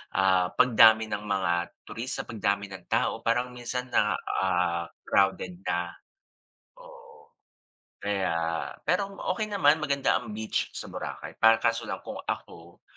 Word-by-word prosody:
ah, 95 -1 +3
pagdami 110 -2 +6
ng 105 0 -3
mga 95 -3 +1 0.3
turista, 120 +3 -4
pagdami 100 -2 -2
ng 95 -2 -10
tao - - +1
parang 125 +2 0
minsan 125 +1 -5
na, 105 -3 +3
ah, 90 -2 0 0.2
crowded 95 -2 +2
na, 85 0 -1 0.9
oo, 475 -2 -16 0.7
kaya 100 -3 0 0.5
pero 195 +4 +1 0.2
okay 200 +4 0
naman 155 -7 +4
maganda 140 -2 +2
ang - - -9
beach 110 +1 -2
sa - - -6
Boracay - - -7
pa 115 0 +6
kaso 115 +1 +1
lang - - -3
kung - - -6
ako, 85 +1 -6
110 Hz, 135 wpm, -27 LUFS, 95-130 Hz, 0.9 s, pagdami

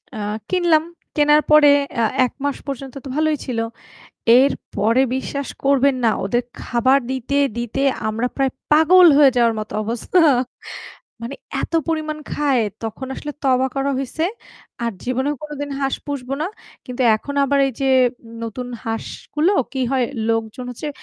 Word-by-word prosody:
আ - - -6 0.3
কিনলাম। 345 -4 +3 0.3
কেনার 295 0 +5
পরে 300 -1 +8 0.3
আ - - +3 0.2
১ 250 - -5
মাস 285 -1 -1
পর্যন্ত 275 -1 -5
তো - - -6
ভালোই 310 -1 +2
ছিল। 240 -3 -2 0.8
এরপরে 235 -3 +1
বিশ্বাস 280 +1 -4 0.2
করবেন 275 0 +4
না 225 - +5
ওদের 240 +5 0 0.2
খাবার 255 +3 +3
দিতে, 265 +1 -2 0.2
দিতে 240 +3 -2 0.3
আমরা 225 +3 -1
প্রায় 270 -2 +1 0.2
পাগল 345 +4 +7
হয়ে 285 -2 +7
যাওয়ার 235 -2 +3
মতো 215 - -7
অবস্থা। 235 - +1 1.0
মানে 235 +4 -5 0.3
এত - - -5 0.2
পরিমাণ 310 -1 -2
খায় 275 -5 +1 0.2
তখন 225 +4 -5
আসলে 295 - -6
তওবা 260 -1 +3
করা 275 0 0
হইছে। 275 +4 -2 0.6
আর 235 -1 -1
জীবনেও 260 +4 -1
কোনদিন 290 -1 -6
হাঁস 270 -1 0
পুষবো 275 -2 -4
না। - - 0 0.4
কিন্তু 250 0 -3
এখন 285 +6 -7
আবার 280 +1 +1
এই 270 - -3
যে 270 - +1 0.5
নতুন 230 +2 -5 0.2
হাঁসগুলো 300 - -2 0.2
কি 265 - -3
হয় 260 -2 +2 0.2
লোকজন 225 +2 -2
হচ্ছে 250 +5 -6
270 Hz, 150 wpm, -20 LUFS, 245-295 Hz, 1.0 s, পরে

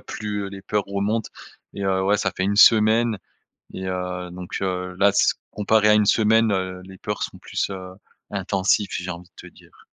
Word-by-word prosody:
plus, 105 -2 -5
heu, - - -6
les 100 0 -9
peurs 105 +2 -1
remontent 100 +3 -2 0.4
et 100 - -5
heu, 95 -1 +1
ouais 100 +2 +3
ça 100 -1 -1
fait - - -1
1 100 +2 0
semaine 110 +1 +5 0.6
et 95 0 -5
heu, 90 -1 -4
donc, 90 0 -6
heu, 90 -1 -3
là 100 0 +6
s 100 - +3 0.2
comparé 105 0 +2
à - - +7
1 105 -1 +4
semaine, 110 +1 +3
heu, 95 -1 -2
les 95 0 -13
peurs 105 0 -3
sont - - -6
plus, - - -3
heu, 95 -1 -7 0.4
intensives, 100 +1 0
j'ai 90 0 -4
envie 85 0 -7
de - - -12
te - - -28
dire. - - -21
100 Hz, 205 wpm, -23 LUFS, 95-105 Hz, 0.6 s, à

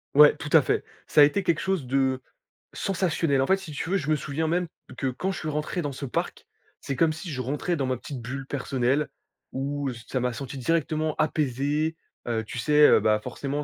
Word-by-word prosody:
Ouais, 150 0 +8
tout - - -6
à - - +8
fait - - 0 0.2
ça 150 - +5
a - - +11
été 185 +7 +3
quelque 170 -3 +1
chose 190 -8 -1
de 130 0 +1 0.5
sensationnel. 170 -7 0
En 135 - +1
fait, 190 - +4
si 190 -5 -9
tu 150 +4 -4
veux 195 - +2
je 155 -3 -3
me 155 - +4
souviens 155 +2 -2
même 175 +1 +1 0.3
que 135 - -1
quand 180 +10 -2
je - - -5
suis 155 - -3
rentré 150 +4 -2
dans 145 -2 -3
ce 135 +1 -6
parc. 125 - -3 0.3
C'est 135 - -4
comme 165 +2 +3
si 170 +3 -7
je 130 -2 -3
rentrais 145 +7 -1
dans 135 -4 -1
ma 130 -2 0
petite 130 -1 -7
bulle 130 +3 -5
personnelle 135 +1 0 0.4
où 140 +1 -2
ç 120 -1 -10
ça 130 - -1
m'a 125 0 0
senti 135 +2 -6
directement 155 +1 0
apaisé, 150 +1 0 0.3
heu, 110 -2 0
tu 120 +3 -6
sais, 150 +3 +6
heu, - - +6
bah, 105 -1 +3
forcément 140 +4 -4
145 Hz, 225 wpm, -26 LUFS, 130-160 Hz, 0.5 s, a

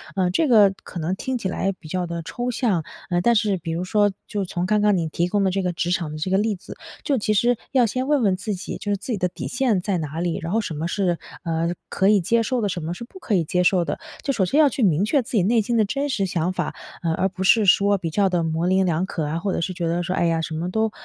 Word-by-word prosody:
呃， 185 -2 +1
这 310 - +2
个 210 -6 +6
可 175 - -7
能 170 +4 -1
听 260 +5 -3
起 200 - -3
来 190 +1 -1
比 155 - -12
较 180 +2 -2
地 170 -1 -4
抽 245 +6 -3
象。 225 - 0 0.3
嗯， 175 - +2
但 235 +4 +3
是 205 -2 +2
比 165 -1 -5
如 170 +2 -2
说 205 +2 +2 0.2
就 205 -2 -2
从 175 -1 -2
刚 210 +2 +2
刚 210 -2 +3
你 165 -2 -1
提 170 +2 -1
供 200 +2 +1
的 190 - +2
这 195 +1 0
个 180 - 0
职 175 +1 -1
场 170 -4 -1
的 155 - -6
这 185 +5 -3
个 190 - +3
例 210 -1 0
子， 180 - -11 0.3
就 275 -3 +1
其 215 0 +1
实 240 +3 +3 0.2
要 255 -3 +4
先 255 +4 -2
问 290 -4 +2
问 190 -3 +3
自 200 +2 -3
己， 185 - -6
就 205 - -4
是 200 - +1
自 240 - -6
己 215 - 0
的 180 - +1
底 - - -6
线 245 -7 +1
在 195 -1 -1
哪 155 -1 -4
里， 175 -1 -1
然 165 +1 -4
后 225 - +2
什 170 - -5
么 160 +3 -2
是， 180 -2 0 0.3
呃， 165 0 -1 0.2
可 190 - +1
以 210 -1 +5
接 230 +7 +2
受 250 0 -1
的， 205 - 0
什 180 -2 -3
么 165 +2 -3
是 205 - -8
不 320 +11 -12
可 220 - -1
以 170 - +2
接 180 +3 0
受 180 -1 +3
的。 145 - -3 0.2
就 275 - 0
首 200 -7 +1
先 275 - +1
要 300 -2 +6
去 260 - -2
明 185 0 +3
确 280 +5 +2
自 235 - -10
己 210 -7 +2
内 225 +3 +3
心 235 +3 -1
的 215 - +4
真 275 +7 -2
实 210 -8 0
想 175 -1 -1
法， - - -2 0.3
呃， 165 -1 +1
而 190 +4 +1
不 190 0 -5
是 215 +2 +5
说 200 +1 +4
比 175 -3 -3
较 195 +4 +2
地 175 -2 +1
模棱两可 170 0 0
啊， 155 +3 -2
或 190 +2 -2
者 - - -1
是 185 +2 -2
觉 170 -2 -2
得 170 +1 0
说 185 +2 -2
哎 - - +1
呀 165 -1 +1
什 160 0 -4
么 170 +3 -2
都， 220 +2 +1
190 Hz, 330 characters per minute, -23 LUFS, 175-215 Hz, 0.3 s, 个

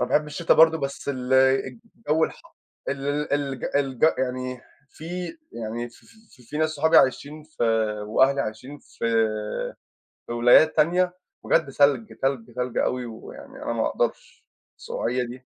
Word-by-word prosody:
أنا - - 0
باحب 150 0 +2
الشتا 165 +3 +1
برضه، 160 0 +6
بس 140 0 -5
ال 130 -2 -3
الجو 155 - +1
الحَرّ - - -9 0.4
ال 145 +2 -2
الج 140 -3 -1
الج 135 -1 0
يعني 130 -1 -3 0.3
في 155 - -13 0.5
يعني 115 +1 -5
في - - -20 0.2
في 125 - -20
في 150 +6 -6
ناس 155 0 +2
صحابي 160 +2 +2
عايشين 145 +3 +2
في 155 -4 -7 0.4
وأهلي 135 +6 +3
عايشين 125 +6 -6
في - - -10 1.2
في - - -5
ولايات 120 +6 +5
تانية، 180 +3 +3 0.3
بجد 140 - +2
تلج، 140 -5 +3
تلج، 125 -4 -1
تلج 125 -1 -2
أوي، 125 -1 0
ويعني 110 -1 -11
أنا - - -2
ما - - 0
اقدَرش - - -3 0.3
السقوعية 125 +2 -2
دي. 125 +2 -10
135 Hz, 145 wpm, -24 LUFS, 125-150 Hz, 1.2 s, برضه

